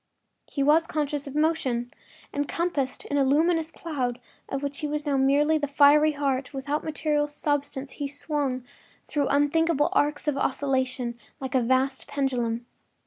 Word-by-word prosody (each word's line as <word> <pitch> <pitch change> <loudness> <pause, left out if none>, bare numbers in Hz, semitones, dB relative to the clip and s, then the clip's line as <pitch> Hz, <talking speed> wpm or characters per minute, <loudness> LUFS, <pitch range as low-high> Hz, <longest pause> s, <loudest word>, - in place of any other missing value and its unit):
He 280 - 0
was 315 +3 +4
conscious 290 -2 -2
of 275 - -7
motion. 275 -6 0 0.4
Encompassed 285 -2 -1
in 285 - 0
a - - +4
luminous 320 +4 +2
cloud, 260 -8 -3 0.3
of 275 +1 -3
which 280 0 -3
he 300 - -2
was 300 +1 -3
now 285 -2 +1
merely 285 +4 +3
the 290 - -1
fiery 295 +2 +5
heart, 275 -1 -1
without 285 +3 -2
material 300 -1 0
substance, 285 -2 -2
he 285 - -4
swung 285 -3 -2 0.4
through 290 -3 0
unthinkable 295 +1 +2
arcs 295 +1 +1
of 285 -2 +1
oscillation, 260 -3 -1 0.2
like 265 0 -5
a 260 - +3
vast 260 +2 +1
pendulum. 245 -4 -1
285 Hz, 150 wpm, -26 LUFS, 265-300 Hz, 0.4 s, fiery